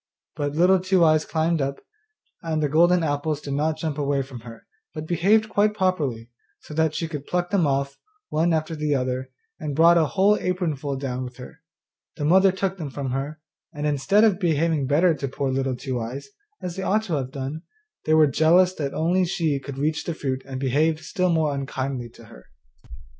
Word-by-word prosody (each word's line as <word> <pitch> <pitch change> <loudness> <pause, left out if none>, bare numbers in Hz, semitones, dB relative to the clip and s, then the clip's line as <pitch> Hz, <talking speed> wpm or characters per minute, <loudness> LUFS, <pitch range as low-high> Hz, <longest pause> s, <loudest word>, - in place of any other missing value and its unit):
But 145 -1 -3
Little 185 +3 +4
Two 185 -1 +2
eyes 155 -1 +3
climbed 160 0 0
up, 135 0 -2 0.6
and 160 -2 -1
the - - +2
golden 170 +3 +4
apples 145 0 -1
did 140 -2 -5
not 155 +2 0
jump 155 -2 -3
away 140 -1 0
from 130 -2 -10
her, 115 0 -12 0.3
but 155 - -5
behaved 195 +7 +2
quite 210 0 +1
properly, 145 - -1 0.3
so - - -11
that 160 0 +1
she 165 - -2
could 150 -3 -7
pluck 175 0 -1
them 185 -6 +2
off, 140 0 -1 0.3
one 165 +3 +1
after 160 0 -1
the 150 -1 0
other, 130 0 -2 0.3
and 150 -3 -4
brought 170 +2 +6
a 160 - +2
whole 200 +4 +3
apron 180 -4 -1
full 140 0 -4
down 130 -2 -4
with 125 0 -9
her. 150 +6 -12 0.5
The 145 - -3
mother 190 +4 +5
took 190 0 -2
them 155 -4 -4
from 135 -1 -4
her, 140 +4 -4 0.3
and, 150 0 -3
instead 150 +9 +3
of 205 -4 +3
behaving 160 -5 +1
better 165 +5 +3
to 140 -2 -4
poor 135 +1 -2
Little 135 -1 -1
Two 130 -1 -4
eyes, 125 - -6 0.3
as 175 -1 -4
they 195 - -4
ought 215 +3 +1
to 180 - -4
have 135 -4 -1
done, 140 +3 -5 0.4
they 155 - +3
were 155 -1 +6
jealous 165 +6 +4
that 140 -6 -4 0.3
she 165 -3 0
only 140 - -1
could 140 -2 -7
reach 150 +2 -1
the 170 - -3
fruit 130 -4 -3
and 130 -1 -5
behaved 155 +5 +1
still 180 +2 0
more 160 -3 +1
unkindly 135 -2 -4
to 115 - -14
her. 60 - -16
155 Hz, 205 wpm, -24 LUFS, 135-170 Hz, 0.6 s, brought